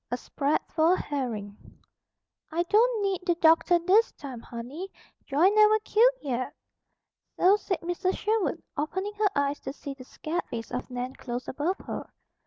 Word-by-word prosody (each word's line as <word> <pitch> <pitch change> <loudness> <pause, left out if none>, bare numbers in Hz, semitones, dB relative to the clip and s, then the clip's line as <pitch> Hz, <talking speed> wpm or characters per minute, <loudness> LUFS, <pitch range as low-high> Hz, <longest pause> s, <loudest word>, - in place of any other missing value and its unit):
A 245 - -1
SPRAT 280 +4 -1
FOR 325 +3 +4
A - - -4
HERRING 225 -8 -3 1.0
"I 335 +2 +1
don't 435 +4 +3
need 390 -2 0
the 345 - +3
doctor 330 +2 +5
this 385 +7 +4
time, 265 -5 -8
honey; 250 +12 -7 0.4
joy 300 +6 +4
never 425 +1 +6
killed 470 +4 +4
yet." 255 -3 -2 0.8
So 380 +3 +6
said 390 -3 -3
Mrs. 355 +2 -1
Sherwood, 415 -7 0
opening 375 +8 -2
her 420 -1 +4
eyes 285 0 0
to 265 - -5
see 280 0 -7
the 270 -1 -12
scared 325 +6 -3
face 230 -1 -6
of 250 +2 -4
Nan 250 +1 -4
close 245 0 -5
above 315 +8 -1
her. - - -6
330 Hz, 165 wpm, -27 LUFS, 265-390 Hz, 1.0 s, never